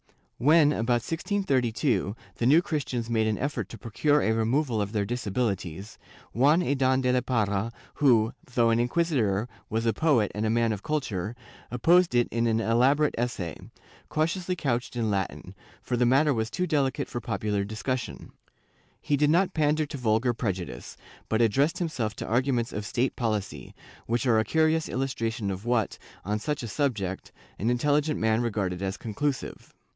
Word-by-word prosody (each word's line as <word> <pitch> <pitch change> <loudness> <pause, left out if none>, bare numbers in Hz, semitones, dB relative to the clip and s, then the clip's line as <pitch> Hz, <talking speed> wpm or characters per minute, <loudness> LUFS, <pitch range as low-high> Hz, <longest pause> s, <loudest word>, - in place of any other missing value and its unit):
* - - -44
When, 155 -3 +6
about 120 -2 0
1632, 135 - 0 0.2
the 120 - -1
New 155 +6 +6
Christians 125 -8 -3
made 110 -1 +2
an 110 - 0
effort 140 +3 -3
to - - -9
procure 145 +6 +1
a 110 - +2
removal 115 +1 +1
of 100 0 -3
their 105 -2 0
disabilities, 100 -4 -3 0.3
Juan 145 +8 +4
Adan 130 -3 +2
de 125 -1 +2
la 125 0 +2
Parra 110 -3 0 0.3
who, 115 -6 +4 0.2
though 115 -1 +4
an 115 - +2
inquisitor 120 - +1 0.2
was 115 +1 -1
a 115 - +2
poet 140 -10 +2
and 105 - -3
a 110 - +1
man 115 0 +2
of 105 -2 -3
culture, 115 -9 -2 0.3
opposed 170 +6 +3
it 120 0 +3
in 115 0 +1
an 115 0 +2
elaborate 130 +7 +3
essay, 95 - -2 0.5
cautiously 175 +4 -1
couched 125 -7 -2
in 115 -3 0
Latin, 95 -1 -3 0.3
for 125 - -1
the 120 0 +2
matter 140 +4 +4
was 110 -2 -1
too 180 +8 -1
delicate 145 -6 0
for 120 - -5
popular 105 -2 -1
discussion. 115 +4 -4 0.7
He 145 - 0
did 145 +1 +2
not 175 +4 +3
pander 155 0 +2
to 145 - -7
vulgar 115 +1 +2
prejudice, 95 - -4 0.3
but 110 +1 +2
addressed 135 +8 +2
himself 125 - -2
to - - -5
arguments 120 0 0
of 105 0 -4
state 125 +2 0
policy, 105 - -3 0.3
which 120 +1 0
are 115 -3 +4
a - - +2
curious 160 +3 +1
illustration 115 -5 -2
of 95 +1 -5
what, 120 -3 0 0.3
on 105 +2 -1
such 150 +3 -3
a - - -4
subject, 105 -7 -2 0.3
an 110 - 0
intelligent 145 +5 +1
man 110 +1 +2
regarded 100 -6 -2
as 95 +1 -2
conclusive. 135 +5 -4
120 Hz, 170 wpm, -27 LUFS, 110-145 Hz, 0.7 s, When